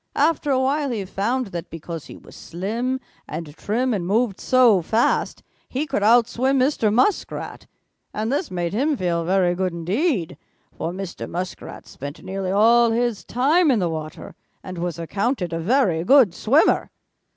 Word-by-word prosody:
After 295 0 +1
a 265 -2 +3
while 280 +2 0
he 215 -6 -3
found 220 +4 -2
that 170 0 -5
because 165 -1 -7
he - - -10
was - - -16
slim 230 +9 -3 0.3
and 155 -1 -7
trim 240 +7 -1
and 180 -5 -2
moved 215 0 +1
so 245 -7 +4
fast, 220 +8 0 0.3
he 275 +4 -2
could 270 -7 -2
out 230 +2 +5
swim 260 +3 0
Mr. 255 -5 +2
Muskrat, 255 - -1 0.4
and 220 +3 -3
this 290 +4 -1
made 175 -1 -3
him 280 +6 +1
feel 170 -3 -1
very 180 0 +2
good 185 0 -2
indeed, 185 - -1 0.4
for 165 - -3
Mr. 185 -1 -6
Muskrat 180 +1 -6
spent 140 +2 -9
nearly 190 -1 -4
all 230 +4 +5
his 235 -2 -1
time 300 +8 +2
in 255 - +3
the 180 -4 0
water 155 -1 -7 0.3
and 185 -2 -7
was 175 -1 -3
accounted 185 - -2
a 165 - -2
very 185 -4 +1
good 250 -4 +5
swimmer. 265 - +2
210 Hz, 165 wpm, -22 LUFS, 175-255 Hz, 0.4 s, out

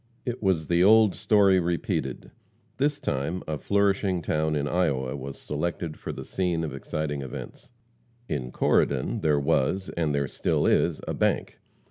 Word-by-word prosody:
It 125 0 -3
was 95 -6 +1
the 85 +2 +3
old 110 0 +6
story 100 -3 +4
repeated. 85 -6 -2 0.5
This 145 +2 +1
time 70 +7 -2
a 75 -2 -3
flourishing 100 -3 +1
town 75 0 0
in 70 -1 -1
Iowa 70 -6 0
was 70 0 -7
selected 80 +1 -3
for - - -6
the - - -7
scene 90 -3 -1
of 75 - -4
exciting 75 +1 -3
events. 65 -2 -8 0.6
In 65 -4 -3
Corydon 65 0 +1
there 75 -2 +2
was, 75 +7 +1
and 80 -4 0
there 70 -1 0
still - - 0
is, - - +2
a - - -1
bank. - - 0
80 Hz, 155 wpm, -26 LUFS, 70-95 Hz, 0.6 s, old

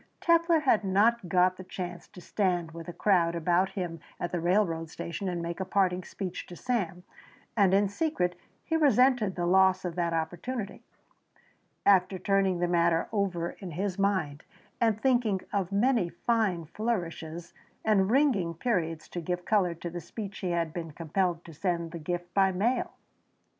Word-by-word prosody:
Telfer 335 -1 +3
had 230 -7 +3
not 200 +1 +2
got 185 +1 +3
the 185 - -8
chance 180 -1 -6
to 180 - -13
stand 175 -4 -1
with 165 0 -9
a - - -4
crowd 170 -3 +2
about 175 +3 +2
him 175 -4 -4 0.2
at 175 - -3
the 175 - -1
railroad 170 -2 +1
station 170 +4 -4
and 175 -1 -3
make 170 +1 -4
a - - 0
parting 185 -1 +1
speech 185 -1 -6
to 175 - -9
Sam, 195 -7 -2 0.5
and 200 -4 +4
in 200 +1 +4
secret 200 - -1 0.3
he 325 - -1
resented 255 -9 +3
the 175 - -1
loss 190 +1 +4
of 175 - -2
that 170 -1 0
opportunity. 175 +8 -3 1.0
After 190 -1 +4
turning 195 -1 +1
the 175 0 0
matter 170 -1 +2
over 185 -5 -1
in 185 -5 -9
his 190 +3 -2
mind 165 -7 0 0.4
and 225 -2 +2
thinking 240 -6 +2
of 195 -2 -1
many 215 -2 +2
fine 195 -3 0
flourishes 170 -4 -4 0.3
and 200 -3 +3
ringing 225 - +2
periods 165 -6 -1
to 175 - -5
give 180 +2 -3
colour 185 -5 +2
to 170 +1 -6
the 175 0 -5
speech 200 +3 -7
he 185 - -2
had 170 -2 -1
been 165 -2 -5
compelled 170 +2 -1
to 165 - -11
send 170 0 -2
the 170 - -6
gift 175 +2 -4
by 195 -1 +4
mail. 215 +8 0
185 Hz, 170 wpm, -29 LUFS, 170-205 Hz, 1.0 s, and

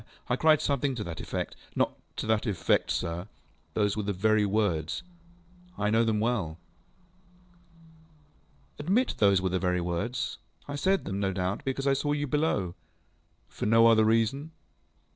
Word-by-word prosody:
ŌĆ£I 125 - +1
cried 155 -1 +5
something 140 -1 0
to 110 - -3
that 85 -3 -6
effectŌĆöŌĆØ - - -4 0.2
ŌĆ£Not - - +2 0.2
to - - -4
that 110 +1 +1
effect, 100 -5 +1
sir. 85 +3 -2 0.5
Those 105 -2 +1
were 110 - -1
the 105 0 -2
very 105 +2 +2
words. 95 -7 0 0.7
I 105 0 0
know 115 +1 +4
them 110 -2 +1
well. 105 -9 -1 2.2
ŌĆØ 145 - -6
ŌĆ£Admit 235 +8 +2
those 100 -3 +4
were 95 - +1
the 95 0 0
very 90 0 +1
words. 90 +9 -2 0.3
I 145 - -4
said 190 +7 +1
them, 100 0 -3
no 100 -1 0
doubt, 95 +4 -2
because 135 0 -2
I 140 - +4
saw 145 +2 0
you 145 0 -1
below. 140 - 0
ŌĆØ - - -37
ŌĆ£For - - +1
no 115 +1 +6
other 115 -1 +6
reason? 115 +7 +1
110 Hz, 165 wpm, -28 LUFS, 95-135 Hz, 2.2 s, no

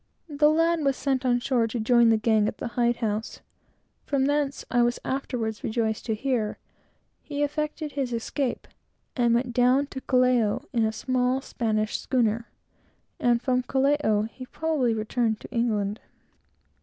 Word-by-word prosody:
The 295 0 +3
lad 330 +2 +2
was 275 -2 +1
sent 265 -2 0
on 245 -1 +3
shore 240 -2 +1
to 230 +2 -4
join 235 +1 +4
the 225 - +4
gang 215 -1 +2
at 215 - -4
the 240 - -4
hide 240 0 +1
house; 220 -2 -3 0.6
from 275 -2 0
whence, 285 -1 -1
I 245 - +3
was 240 0 +2
afterwards 240 -5 -3
rejoiced 220 0 -1
to 220 - 0
hear, 230 -3 -1 0.6
he 290 -1 -3
effected 300 +1 -3
his 270 -3 -2
escape, 240 +3 -2 0.5
and 235 -2 +3
went 245 0 -1
down 250 +3 +3
to 265 - -5
Callao 250 -2 +2
in 230 -2 +2
a 220 - 0
small 255 +2 0
Spanish 215 -5 -2
schooner; 235 -2 0 0.7
and 240 -1 +2
from 255 -1 +2
Callao, 265 -5 +1
he 255 +4 -8
probably 290 -8 0
returned 220 0 -1
to - - -11
England. 220 -3 0
245 Hz, 155 wpm, -26 LUFS, 225-270 Hz, 0.7 s, join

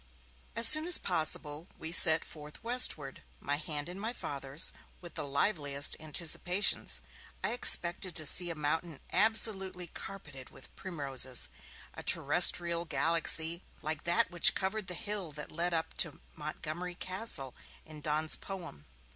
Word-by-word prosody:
As 230 0 +5
soon 310 +2 +7
as 355 - +4
possible 155 -1 -2
we 160 - -7
set 160 -2 +4
forth 150 +3 -11
westward, 225 - +1 0.2
my 145 0 -2
hand 150 0 -5
in 180 +2 -8
my 225 +4 -4
Father's, 140 - -4 0.3
with 175 -1 -12
the - - -5
liveliest 140 -2 0
anticipations. 170 +5 0 0.4
I - - 0
expected 180 -6 +4
to 155 - 0
see 175 +4 +4
a 165 - -4
mountain 155 +1 -4
absolutely 195 -5 +3
carpeted 150 -8 -10
with - - -14
primroses, 135 -7 0 0.4
a - - -9
terrestrial 170 -1 +3
galaxy 165 +2 +1 0.2
like 155 0 -4
that 170 +1 +1
which 175 -1 +6
covered 195 +1 -4
the 180 - -4
hill 200 -3 -5
that 150 +1 -8
led 175 +2 -2
up 165 -1 -3
to 165 -5 0 0.2
Montgomery 155 +3 -6
Castle 185 - -1 0.3
in 155 -1 -12
Donne's 155 +1 +2
poem. 170 - -10
165 Hz, 140 wpm, -31 LUFS, 150-185 Hz, 0.4 s, soon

